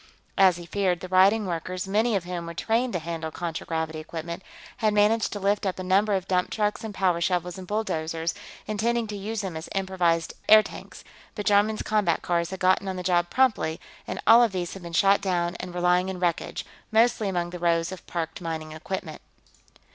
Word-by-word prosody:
As 185 -3 +6
he 175 - -9
feared, 185 -1 0
the 185 - -6
rioting 195 +4 +4
workers, 180 +1 -4
many 215 +3 +2
of 190 - 0
whom 175 -1 -5
were 170 - -7
trained 230 +7 0
to - - +1
handle 165 -1 -4
contragravity 160 -1 -4
equipment, 170 +2 -6 0.4
had 215 -2 +1
managed 210 +2 +3
to 205 - -4
lift 200 +1 +1
up 190 -2 -1
a 185 - -5
number 200 +3 +3
of 190 -1 -3
dump 180 -1 +1
trucks 210 0 -1
and 220 - -4
powershovels 180 -1 0
and 185 - -9
bulldozers, 165 -6 -2 0.3
intending 230 +2 0
to 210 -1 -6
use 210 +2 -3
them 190 -5 -5
as 160 +1 -6
improvised 180 -4 0 0.2
airtanks, 215 0 +3 0.3
but 210 - -4
Jarman's 205 +2 +3
combat 205 -6 +1
cars 170 -1 0
had 190 0 -6
gotten 185 +1 +2
on 190 - -2
the 180 - -5
job 175 -1 +2
promptly 235 -11 +1 0.3
and - - -4
all 230 +1 +8
of 230 -4 +3
these 175 -2 -3
had 195 - -9
been 170 -1 -8
shot 195 +4 +4
down 175 -2 0
and 180 - -6
were 175 - -4
lying 180 +1 +3
in 185 -1 -5
wreckage, 175 -2 -1 0.3
mostly 220 -2 +3
among 175 -2 -2
the 180 - -7
rows 170 0 +1
of 185 - -9
parked 165 -1 -4
mining 160 -2 -4
equipment. 160 +1 -6
185 Hz, 200 wpm, -26 LUFS, 170-205 Hz, 0.4 s, all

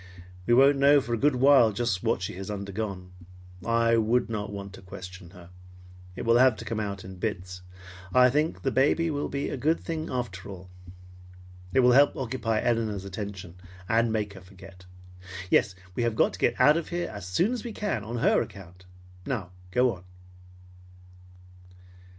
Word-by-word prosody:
"We 120 - +5
won't 135 +2 +5
know 140 +1 +6
for 120 -3 -4
a - - +1
good 145 +1 +3
while 130 -3 +5
just 105 -3 -1
what - - 0
she - - -4
has 95 +1 -7
undergone. 100 -2 -5 0.5
I 115 0 +2
would 115 +2 +1
not 105 -1 -3
want 100 -1 -7
to - - -12
question 95 -1 -10
her. 90 0 -15 0.6
It - - -5
will 115 +1 +4
have 130 -2 +5
to 115 - -9
come 110 0 -3
out 100 -2 -4
in 95 0 -9
bits. 90 -4 -4 0.5
And 90 - -3
I 125 0 +7
think 150 +4 -1
the 135 - 0
baby 155 +5 +2
will 145 -1 -3
be 140 0 -3
a - - -4
good 155 +6 +1
thing 160 -1 -5
after 100 -7 -4
all. 90 -1 -10 1.0
It 130 - +4
will 125 0 +5
help 140 +3 +5
occupy 115 -4 -1
Elinor's 110 -5 -1
attention 95 -3 -7 0.3
and 115 +2 +2
make 105 -2 -2
her 95 - -12
forget. 95 0 -15 0.6
Yes, 100 -4 +3 0.2
we 120 - -2
have 115 -2 0
got - - +2
to - - -9
get - - +1
out 150 +2 +6
of 170 - -4
here 175 0 -2
as 100 -3 -7
soon 100 - +1
as 250 - -4
we 240 - -5
can 205 - -3
on 115 +3 -5
her - - +4
account. 90 -2 -10 0.4
Now 105 -9 -3 0.2
go 125 +4 +2
on." 90 - -13
110 Hz, 185 wpm, -27 LUFS, 95-130 Hz, 1.0 s, I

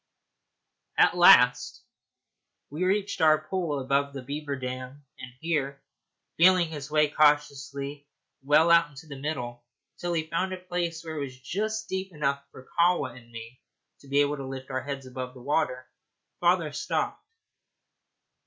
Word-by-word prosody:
At - - +5
last 125 -8 +6 0.9
we 155 +5 -3
reached 200 +2 0
our 155 -1 +6
pool 170 -6 -1
above 140 +1 0
the 135 -2 -7
beaver 145 +2 -4
dam, 130 +2 -7
and 125 - -9
here, 140 -4 -1 0.6
feeling 180 0 +5
his 150 -3 -7
way 150 0 +3
cautiously 145 -1 0 0.3
well 150 +5 +4
out 170 -1 +5
into 145 +2 -13
the 145 -3 -9
middle, 120 -5 -4 0.4
till 175 0 -2
he 160 -2 0
found 175 +4 -2
a - - -4
place 175 -2 -3
where 160 -1 -5
it 145 - -2
was 130 -2 -8
just 215 +10 -3
deep 190 0 -4
enough 140 -2 -1
for 130 - -14
Kahwa 170 -8 +2
and 120 -2 -15
me 115 +2 -10 0.4
to 140 - -18
be 140 +1 +3
able 145 +1 0
to 135 -1 -6
lift 130 0 -7
our 130 0 -1
heads 140 -1 -6
above 130 0 -7
the 125 - -12
water, 130 -3 -1 0.5
father 170 -3 +2
stopped. - - -2
145 Hz, 155 wpm, -27 LUFS, 135-165 Hz, 0.9 s, last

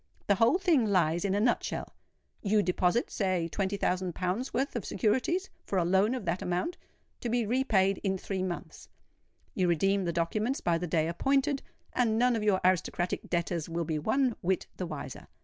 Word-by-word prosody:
The 200 - +4
whole 230 - +4
thing 335 - +3
lies 175 -4 +2
in 195 -1 +1
a - - +2
nut 235 +3 +2
shell: - - -4 0.5
you 210 0 +2
deposit, 180 +5 +1
say 185 -4 0
twenty 195 +3 -2
thousand 180 -2 -1
pounds' 190 +8 -2
worth 270 +1 -1
of 235 - -2
securities, 260 - 0
for 195 - -2
a 175 - +2
loan 190 +7 +3
of 245 -6 -5
that 175 +2 -1
amount, 180 - -1 0.4
to 240 - -3
be 235 0 +1
repaid 205 -5 +2
in 190 -2 0
three 190 0 -3
months; 185 -2 -5 0.6
you 185 -2 +1
redeem 195 +3 +2
the 170 - 0
documents 210 - -1
by 170 -1 +1
the 180 - -3
day 160 -1 +1
appointed, 275 - +1 0.3
and 225 -3 +2
none 245 +1 +3
of 225 - -1
your 205 -3 +3
aristocratic 180 -1 0
debtors 170 -1 -1
will 165 0 -2
be 155 -1 -1
one 245 - +1
whit 185 +1 0
the 180 - -3
wiser. - - -7
195 Hz, 190 wpm, -30 LUFS, 175-235 Hz, 0.6 s, The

